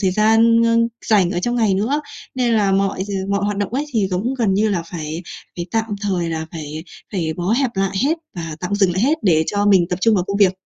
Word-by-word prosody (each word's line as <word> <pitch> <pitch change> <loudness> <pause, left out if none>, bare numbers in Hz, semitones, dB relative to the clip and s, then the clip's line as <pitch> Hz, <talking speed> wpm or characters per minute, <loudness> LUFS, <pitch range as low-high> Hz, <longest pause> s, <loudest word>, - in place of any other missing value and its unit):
thời 190 -3 +2
gian, 225 +3 +4
ơ, 230 0 +3 0.3
rảnh 195 -5 +3
ở 175 - -1
trong 240 +6 -1
ngày 215 -5 +2
nữa. 240 +10 0 0.3
Nên 250 -2 +1
là 200 -3 +2
mọi 195 0 0
d 205 - -9 0.2
mọi 200 0 0
hoạt 205 0 -1
động 205 +1 -2
ấy 285 - 0
thì, 210 -4 +1
giống 200 +8 -1
gần 220 -7 +1
như 215 +2 +2
là, 185 -5 -1
phải 165 -1 -6 0.3
phải 175 - -4
tạm 225 -1 +1 0.2
thời, 185 -5 -1
là 160 0 -3
phải 155 -1 -6 0.3
phải 165 -5 -1
bó 175 +1 -3
hẹp 260 +1 +1
lại 195 0 -1
hết 320 +3 +1 0.2
và 165 -2 -5
tạm 185 +3 -2
dừng 195 -3 +2
lại 185 - -1
hết 305 +6 +2
để 160 -5 +3
cho 205 0 0
mình 190 -4 +5
tập 180 - -1
trung 225 -1 +4
vào 180 -3 +1
công 200 +1 -2
việc. 195 -3 +4
200 Hz, 255 wpm, -19 LUFS, 180-225 Hz, 0.3 s, mình